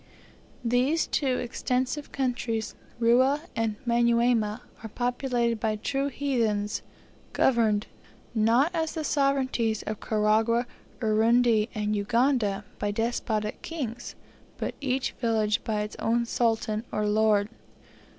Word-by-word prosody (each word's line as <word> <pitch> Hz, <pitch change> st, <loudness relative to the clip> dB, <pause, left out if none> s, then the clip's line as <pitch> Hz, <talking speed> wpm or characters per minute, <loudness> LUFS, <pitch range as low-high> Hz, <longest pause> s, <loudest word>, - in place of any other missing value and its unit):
These 255 Hz, +7 st, +2 dB
two 260 Hz, -4 st, 0 dB
extensive 255 Hz, +4 st, -2 dB
countries, 240 Hz, -4 st, -2 dB, 0.2 s
Rua 255 Hz, +5 st, +4 dB
and 225 Hz, -2 st, 0 dB
Manyuema, 235 Hz, -2 st, +2 dB, 0.2 s
are 220 Hz, -, -7 dB
populated 245 Hz, -1 st, -1 dB
by 215 Hz, 0 st, 0 dB
true 275 Hz, +6 st, -1 dB
heathens, 230 Hz, -7 st, -1 dB, 0.5 s
governed, 220 Hz, -5 st, +2 dB, 0.5 s
not 235 Hz, +8 st, +3 dB
as 320 Hz, -1 st, -1 dB
the 315 Hz, -, -2 dB
sovereignties 265 Hz, -7 st, +1 dB
of 215 Hz, -1 st, -4 dB
Karagwah, 220 Hz, +2 st, +2 dB, 0.4 s
Urundi, 225 Hz, 0 st, +3 dB
and 210 Hz, 0 st, 0 dB
Uganda, 215 Hz, -1 st, +1 dB
by 205 Hz, -, -1 dB
despotic 215 Hz, -1 st, -2 dB
kings, 240 Hz, -8 st, -5 dB, 0.4 s
but -, -, -3 dB
each 265 Hz, -1 st, 0 dB
village 220 Hz, -3 st, +1 dB
by 215 Hz, -2 st, -1 dB
its 210 Hz, 0 st, -5 dB
own 235 Hz, +1 st, +1 dB
sultan 225 Hz, -2 st, 0 dB
or 210 Hz, -, -1 dB
lord. 210 Hz, -1 st, +3 dB
235 Hz, 110 wpm, -27 LUFS, 215-250 Hz, 0.5 s, Rua